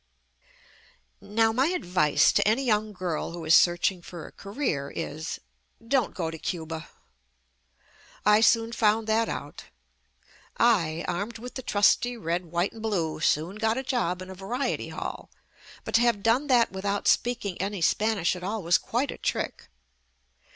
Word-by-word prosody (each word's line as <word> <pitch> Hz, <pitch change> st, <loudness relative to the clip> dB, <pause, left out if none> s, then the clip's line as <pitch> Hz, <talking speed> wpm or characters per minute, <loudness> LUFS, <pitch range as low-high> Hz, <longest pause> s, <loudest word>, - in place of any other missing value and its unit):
Now 225 Hz, +2 st, +2 dB
my 260 Hz, +5 st, +2 dB
advice 180 Hz, -, +2 dB
to -, -, +2 dB
any 230 Hz, +6 st, +2 dB
young 215 Hz, -2 st, +1 dB
girl 180 Hz, -4 st, -3 dB
who 170 Hz, -1 st, -7 dB
is 155 Hz, -, +4 dB
searching 175 Hz, +1 st, +4 dB
for 170 Hz, -2 st, -9 dB
a -, -, -11 dB
career, 200 Hz, -, -3 dB
is 155 Hz, +4 st, -5 dB, 0.2 s
— 230 Hz, -, -25 dB
don't 255 Hz, -6 st, +1 dB
go 165 Hz, -3 st, -2 dB
to 160 Hz, -, -8 dB
Cuba. 160 Hz, -1 st, -5 dB, 1.4 s
I 210 Hz, +1 st, +6 dB
soon 225 Hz, 0 st, +4 dB
found 220 Hz, -1 st, +2 dB
that 225 Hz, +1 st, +1 dB
out. -, -, -6 dB, 0.9 s
I, 170 Hz, -9 st, +2 dB
armed 200 Hz, +6 st, -3 dB
with 245 Hz, +2 st, -9 dB
the 260 Hz, -, -5 dB
trusty 240 Hz, +2 st, +2 dB
red, 175 Hz, -3 st, -2 dB
white 175 Hz, +3 st, -1 dB
and 225 Hz, -, -10 dB
blue, 180 Hz, -9 st, -1 dB
soon 165 Hz, +5 st, 0 dB
got 220 Hz, +1 st, +1 dB
a 265 Hz, -, -2 dB
job 185 Hz, -9 st, -1 dB
in 185 Hz, -, -10 dB
a -, -, -6 dB
variety 230 Hz, +9 st, -3 dB
hall, -, -, -6 dB, 0.5 s
but -, -, -7 dB
to 230 Hz, -, +5 dB
have 235 Hz, -4 st, +2 dB
done 245 Hz, +6 st, +2 dB
that 245 Hz, -4 st, +4 dB
without 200 Hz, +1 st, -2 dB
speaking 220 Hz, -7 st, +1 dB
any 200 Hz, 0 st, -2 dB
Spanish 210 Hz, 0 st, +1 dB
at 180 Hz, -, -9 dB
all 205 Hz, +2 st, -3 dB
was 170 Hz, +1 st, +4 dB
quite 255 Hz, +4 st, -1 dB
a -, -, -9 dB
trick. -, -, -3 dB
205 Hz, 165 wpm, -27 LUFS, 175-230 Hz, 1.4 s, I